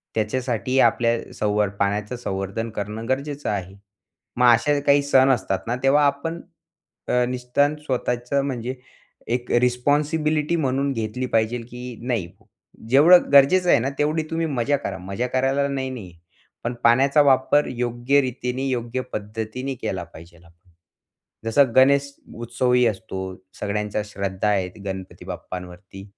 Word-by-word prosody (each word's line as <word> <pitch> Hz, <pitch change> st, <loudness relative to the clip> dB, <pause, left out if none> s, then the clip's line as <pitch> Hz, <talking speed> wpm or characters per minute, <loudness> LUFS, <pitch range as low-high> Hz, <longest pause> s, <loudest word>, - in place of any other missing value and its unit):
त्याच्यासाठी 125 Hz, +3 st, -1 dB
आपल्याला 115 Hz, -2 st, +2 dB
संव 105 Hz, 0 st, 0 dB, 0.2 s
पाण्याचं 105 Hz, +4 st, -1 dB
संवर्धन 100 Hz, 0 st, -4 dB
करणं 105 Hz, +3 st, -4 dB
गरजेचं 140 Hz, +2 st, -2 dB
आहे. 95 Hz, -2 st, -4 dB, 0.6 s
मग 125 Hz, -, +4 dB
असे 145 Hz, +5 st, +1 dB
काही 140 Hz, 0 st, +4 dB
सण 135 Hz, -1 st, +4 dB
असतात 105 Hz, -7 st, +1 dB
ना, 120 Hz, +1 st, -1 dB
तेव्हा 145 Hz, +2 st, +4 dB
आपण 140 Hz, +4 st, -2 dB, 0.7 s
अ, 125 Hz, 0 st, +2 dB
निदान 125 Hz, +4 st, 0 dB
स्वतःचं 130 Hz, -2 st, -2 dB
म्हणजे 125 Hz, -1 st, -3 dB, 0.6 s
एक 125 Hz, 0 st, -2 dB
रिस्पॉन्सिबिलिटी 150 Hz, +5 st, +1 dB
म्हणून 140 Hz, -2 st, 0 dB
घेतली 115 Hz, +1 st, -3 dB
पाहिजेल, 115 Hz, 0 st, 0 dB
की 125 Hz, 0 st, -8 dB
नाही 115 Hz, -8 st, -2 dB, 0.6 s
जेवढं 165 Hz, +7 st, +7 dB
गरजेचं 160 Hz, +7 st, +6 dB
आहे -, -, +6 dB
ना, 130 Hz, -, -1 dB
तेवढी 155 Hz, +2 st, +1 dB
तुम्ही 165 Hz, 0 st, -1 dB
मजा 140 Hz, -1 st, 0 dB
करा. 95 Hz, -7 st, -5 dB
मजा 100 Hz, +6 st, -3 dB
करायला 135 Hz, +2 st, +1 dB
नाही 135 Hz, -1 st, -3 dB
नाहीये. 105 Hz, -9 st, -8 dB, 0.5 s
पण 120 Hz, +1 st, -2 dB
पाण्याचा 135 Hz, +5 st, +5 dB
वापर 140 Hz, +1 st, +3 dB
योग्य 125 Hz, +3 st, +1 dB
रीतीने, 125 Hz, 0 st, -3 dB
योग्य 120 Hz, 0 st, -2 dB
पद्धतीने 110 Hz, +5 st, -4 dB
केला 90 Hz, -2 st, -3 dB
पाहिजेल. 85 Hz, +1 st, -15 dB, 1.0 s
जसं 125 Hz, +2 st, +3 dB
गणेश 140 Hz, +2 st, +5 dB, 0.2 s
उत्सवही 125 Hz, +1 st, +1 dB
असतो. 100 Hz, -2 st, -3 dB, 0.4 s
सगळ्यांच्या 105 Hz, +1 st, -2 dB
श्रद्धा 100 Hz, 0 st, -3 dB
आहेत, 95 Hz, -3 st, 0 dB
गणपती 95 Hz, -1 st, -7 dB
बाप्पांवरती. 90 Hz, +2 st, -8 dB
125 Hz, 130 wpm, -23 LUFS, 105-140 Hz, 1.0 s, जेवढं